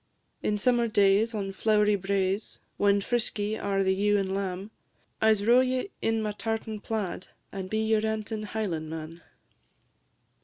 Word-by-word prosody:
In 210 Hz, -, 0 dB
summer 240 Hz, +2 st, +2 dB
days, 210 Hz, +2 st, +3 dB
on 195 Hz, -2 st, -3 dB
flow'ry 210 Hz, 0 st, +3 dB
braes, 195 Hz, +1 st, -1 dB, 0.2 s
When 200 Hz, 0 st, +3 dB
frisky 215 Hz, -2 st, -1 dB
are 195 Hz, -2 st, 0 dB
the 190 Hz, 0 st, +2 dB
ewe 205 Hz, +2 st, +2 dB
and 190 Hz, -1 st, -1 dB
lamb, 195 Hz, +1 st, -3 dB, 0.5 s
I 220 Hz, -, +5 dB
'se 205 Hz, -2 st, +1 dB
row 240 Hz, +4 st, +6 dB
ye 255 Hz, +8 st, 0 dB
in 225 Hz, -1 st, +1 dB
my 210 Hz, -, -1 dB
tartan 220 Hz, 0 st, -3 dB
plaid, 205 Hz, -4 st, -4 dB, 0.2 s
And 190 Hz, -1 st, -5 dB
be 220 Hz, +1 st, 0 dB
your 220 Hz, -1 st, +3 dB
rantin' 220 Hz, 0 st, -2 dB
Highlandman. 165 Hz, -6 st, -4 dB
210 Hz, 150 wpm, -28 LUFS, 195-220 Hz, 0.5 s, row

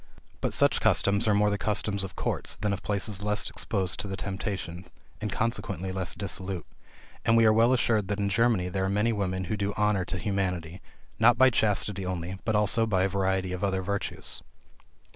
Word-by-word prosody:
But -, -, 0 dB
such -, -, +3 dB
customs 100 Hz, +3 st, +3 dB
are 105 Hz, -, +4 dB
more 105 Hz, 0 st, +3 dB
the 100 Hz, -, -1 dB
customs 105 Hz, -2 st, 0 dB
of 95 Hz, -, -7 dB
courts, -, -, -2 dB
than 105 Hz, -1 st, -1 dB
of 95 Hz, -, -4 dB
places 100 Hz, -1 st, -1 dB
less 105 Hz, 0 st, +1 dB
exposed 95 Hz, -5 st, -2 dB
to 95 Hz, -1 st, -3 dB
temptation, 95 Hz, -3 st, -4 dB, 0.4 s
and 105 Hz, -2 st, -2 dB
consequently 100 Hz, -5 st, -2 dB
less 95 Hz, -1 st, -3 dB
dissolute; 95 Hz, -2 st, -4 dB, 0.6 s
and 115 Hz, 0 st, +4 dB
we 115 Hz, -, +5 dB
are 110 Hz, -, +6 dB
well 115 Hz, +3 st, +4 dB
assured 110 Hz, -5 st, +2 dB
that 105 Hz, +1 st, -2 dB
in 100 Hz, -, +1 dB
Germany 110 Hz, -3 st, +2 dB
there 95 Hz, +1 st, -1 dB
are -, -, 0 dB
many 105 Hz, +4 st, +1 dB
women 95 Hz, -3 st, -2 dB
who 95 Hz, +4 st, -2 dB
do 100 Hz, 0 st, -2 dB
honor 105 Hz, -2 st, +2 dB
to 90 Hz, -, -3 dB
humanity, 90 Hz, -3 st, -2 dB, 0.4 s
not 120 Hz, +2 st, +6 dB
by 130 Hz, +1 st, +6 dB
chastity 105 Hz, -3 st, +1 dB
only, 90 Hz, 0 st, -4 dB
but 110 Hz, -, +1 dB
also 105 Hz, +2 st, +3 dB
by 95 Hz, -4 st, +2 dB
a 95 Hz, -, +1 dB
variety 95 Hz, -1 st, 0 dB
of 90 Hz, -, -4 dB
other 95 Hz, -1 st, 0 dB
virtues. 100 Hz, +1 st, -3 dB
100 Hz, 195 wpm, -28 LUFS, 95-105 Hz, 0.6 s, are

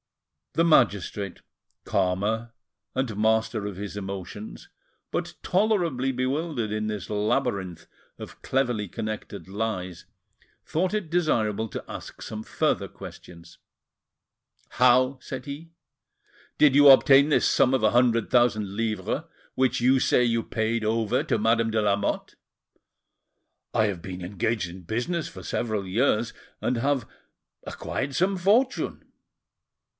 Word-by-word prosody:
The 165 Hz, -, +2 dB
magistrate, 100 Hz, -, +2 dB, 0.4 s
calmer, 105 Hz, +5 st, 0 dB, 0.4 s
and 130 Hz, -4 st, -2 dB
master 110 Hz, 0 st, +1 dB
of 100 Hz, -3 st, -6 dB
his 100 Hz, 0 st, -6 dB
emotions, 100 Hz, +1 st, -7 dB, 0.4 s
but -, -, -3 dB
tolerably 175 Hz, -, +1 dB
bewildered 130 Hz, -2 st, -2 dB
in 110 Hz, 0 st, -2 dB
this 105 Hz, -4 st, -4 dB
labyrinth 105 Hz, -5 st, -1 dB, 0.3 s
of -, -, -10 dB
cleverly 120 Hz, -7 st, 0 dB
connected 110 Hz, -4 st, -6 dB
lies, 95 Hz, -4 st, -4 dB, 0.6 s
thought 180 Hz, +5 st, -1 dB
it 210 Hz, -6 st, -2 dB
desirable 115 Hz, -, 0 dB
to -, -, -6 dB
ask -, -, -9 dB
some 110 Hz, 0 st, -6 dB
further -, -, 0 dB
questions. 85 Hz, -1 st, -12 dB, 1.1 s
"How," 130 Hz, +2 st, +4 dB
said 130 Hz, -1 st, -7 dB
he, 145 Hz, +4 st, -7 dB, 0.9 s
"did 145 Hz, -3 st, +5 dB
you 145 Hz, 0 st, +8 dB
obtain 135 Hz, +1 st, +7 dB
this 150 Hz, -, +3 dB
sum 130 Hz, -, +3 dB
of 130 Hz, -4 st, +1 dB
a 110 Hz, -, +4 dB
hundred 120 Hz, -2 st, +3 dB
thousand 110 Hz, -5 st, +2 dB
livres 110 Hz, -3 st, -1 dB, 0.3 s
which 130 Hz, -1 st, +1 dB
you 130 Hz, +2 st, +4 dB
say 125 Hz, -, +3 dB
you 115 Hz, -1 st, +1 dB
paid 110 Hz, 0 st, -1 dB
over 110 Hz, 0 st, +1 dB
to -, -, 0 dB
Madame 115 Hz, +1 st, +2 dB
de 110 Hz, 0 st, +1 dB
Lamotte?" 100 Hz, -1 st, -1 dB, 1.4 s
"I 110 Hz, -, +3 dB
have 100 Hz, -5 st, -2 dB
been 90 Hz, +1 st, -7 dB
engaged 100 Hz, +2 st, -1 dB
in 90 Hz, +2 st, -10 dB
business 120 Hz, -, -2 dB
for -, -, -11 dB
several 110 Hz, -4 st, -2 dB
years, 115 Hz, +2 st, +1 dB, 0.3 s
and 125 Hz, -, 0 dB
have 135 Hz, 0 st, 0 dB, 0.6 s
acquired 140 Hz, 0 st, -4 dB
some 190 Hz, +6 st, +2 dB
fortune." 215 Hz, +9 st, +1 dB
115 Hz, 125 wpm, -26 LUFS, 105-135 Hz, 1.4 s, you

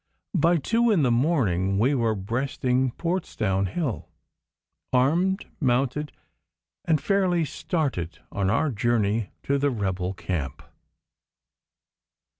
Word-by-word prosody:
By 170 Hz, -1 st, +3 dB
two 230 Hz, -, +2 dB
in 190 Hz, -9 st, +3 dB
the 125 Hz, -, +3 dB
morning 110 Hz, -, +2 dB
we 125 Hz, +7 st, +3 dB
were 115 Hz, -4 st, +1 dB
breasting 125 Hz, +5 st, 0 dB
Portsdown 115 Hz, -, -1 dB
Hill, 130 Hz, -, -3 dB, 0.8 s
armed, 170 Hz, +10 st, +2 dB
mounted, 135 Hz, +2 st, 0 dB, 0.7 s
and 160 Hz, -2 st, +2 dB
fairly 185 Hz, -3 st, +2 dB
started 140 Hz, -, -2 dB
on 100 Hz, -2 st, 0 dB
our 135 Hz, +8 st, +2 dB
journey 110 Hz, -2 st, +1 dB
to 140 Hz, 0 st, +1 dB
the 145 Hz, +1 st, +2 dB
rebel 95 Hz, -5 st, -2 dB
camp. 80 Hz, -8 st, -4 dB
130 Hz, 105 wpm, -25 LUFS, 100-160 Hz, 0.8 s, By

